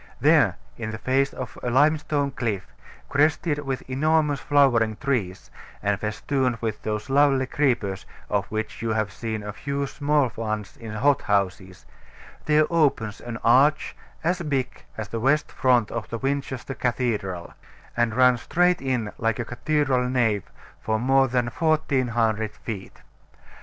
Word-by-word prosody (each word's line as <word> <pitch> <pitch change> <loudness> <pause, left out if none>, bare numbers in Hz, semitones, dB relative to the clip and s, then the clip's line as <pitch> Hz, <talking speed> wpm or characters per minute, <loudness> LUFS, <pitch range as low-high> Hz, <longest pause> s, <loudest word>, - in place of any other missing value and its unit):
There, 145 - +4 0.2
in 115 -2 -4
the 110 - -5
face 135 +4 +1
of 125 -5 -7
a 125 - -2
limestone 145 +1 +2
cliff, 115 -7 -2 0.4
crested 150 +1 +1
with 135 -3 -3
enormous 150 +2 +1
flowering 125 -7 +3
trees, 110 -9 -2 0.3
and 100 -1 +1
festooned 125 +4 -1
with 110 -2 -3
those 105 +2 -3
lovely 135 -1 +3
creepers 120 -9 -1 0.2
of 100 -1 -1
which 110 0 -4
you 115 -1 0
have 110 -3 -1
seen 110 +1 -4
a 105 0 -5
few 140 +5 -3
small 145 -2 +1
ones 110 -2 -4
in 115 -2 -9
hothouses, 100 -7 0 0.6
there 155 0 +4
opens 135 -10 +1
an 120 -1 -6
arch 135 +6 +4 0.3
as 175 +2 0
big 135 -6 -2
as 110 -3 -5
the 115 - -3
west 140 +6 +2
front 125 -4 +2
of 115 -5 -5
Winchester 135 -1 -2
Cathedral, 110 -9 -2 0.4
and 120 -2 +1
runs 125 -1 +4
straight 180 -1 +2
in 125 -5 -1
like 115 +2 0
a 120 - -3
cathedral 130 0 0
nave 115 -6 0 0.3
for 110 0 -1
more 135 +3 +3
than 125 -1 +1
1400 120 -7 0
feet. 105 -5 -8
125 Hz, 140 wpm, -24 LUFS, 110-140 Hz, 0.6 s, There